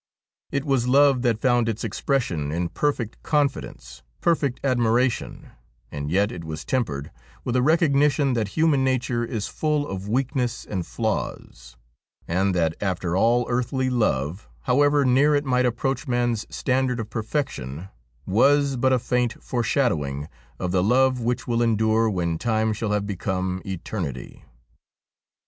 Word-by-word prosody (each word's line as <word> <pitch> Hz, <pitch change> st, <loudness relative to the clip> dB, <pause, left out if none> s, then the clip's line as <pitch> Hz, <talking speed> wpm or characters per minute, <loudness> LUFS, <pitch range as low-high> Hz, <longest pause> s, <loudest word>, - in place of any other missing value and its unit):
It 140 Hz, +1 st, -1 dB
was 135 Hz, -4 st, +1 dB
love 135 Hz, 0 st, +5 dB
that 120 Hz, -3 st, +1 dB
found 120 Hz, -2 st, +2 dB
its 110 Hz, 0 st, -3 dB
expression 105 Hz, -, -1 dB
in 85 Hz, +2 st, -1 dB
perfect 130 Hz, -6 st, -2 dB
confidence, 135 Hz, -, -2 dB, 0.2 s
perfect 145 Hz, -6 st, +1 dB
admiration, 125 Hz, -1 st, 0 dB, 0.4 s
and 75 Hz, 0 st, -4 dB
yet 100 Hz, +5 st, +2 dB
it 85 Hz, -, -7 dB
was 80 Hz, -1 st, -6 dB
tempered 75 Hz, -, -2 dB, 0.3 s
with 125 Hz, -, -2 dB
a 125 Hz, -, +3 dB
recognition 145 Hz, -2 st, +3 dB
that 115 Hz, -4 st, 0 dB
human 155 Hz, -4 st, +3 dB
nature 125 Hz, -2 st, 0 dB
is 115 Hz, -3 st, -3 dB
full 150 Hz, -2 st, -1 dB
of 95 Hz, +1 st, -5 dB
weakness 125 Hz, 0 st, -1 dB
and 90 Hz, -4 st, -4 dB
flaws, -, -, -4 dB, 0.5 s
and 95 Hz, +2 st, +1 dB
that 80 Hz, -2 st, +1 dB
after 90 Hz, -3 st, -1 dB
all 120 Hz, +5 st, +3 dB
earthly 125 Hz, +1 st, -1 dB
love, 90 Hz, -, -1 dB
how 125 Hz, +3 st, +2 dB
ever 145 Hz, -1 st, +4 dB
near 140 Hz, +4 st, +4 dB
it 145 Hz, 0 st, 0 dB
might 125 Hz, -1 st, +2 dB
approach 135 Hz, +5 st, -2 dB
man's 120 Hz, -3 st, 0 dB
standard 130 Hz, -2 st, 0 dB
of 110 Hz, -1 st, -5 dB
perfection, 100 Hz, -, -3 dB, 0.4 s
was 140 Hz, +6 st, +3 dB
but 130 Hz, +2 st, +2 dB
a 130 Hz, -, +4 dB
faint 125 Hz, -1 st, -1 dB
foreshadowing 85 Hz, -, 0 dB, 0.3 s
of 90 Hz, +5 st, -3 dB
the 90 Hz, 0 st, +2 dB
love 125 Hz, +5 st, +3 dB
which 120 Hz, +1 st, -2 dB
will 120 Hz, -1 st, +1 dB
endure 110 Hz, 0 st, +2 dB
when 85 Hz, -5 st, -1 dB
time 110 Hz, -2 st, +1 dB
shall 110 Hz, 0 st, -3 dB
have 105 Hz, -1 st, 0 dB
become 95 Hz, -1 st, -2 dB
eternity. 85 Hz, -, -5 dB
120 Hz, 145 wpm, -24 LUFS, 95-130 Hz, 0.5 s, love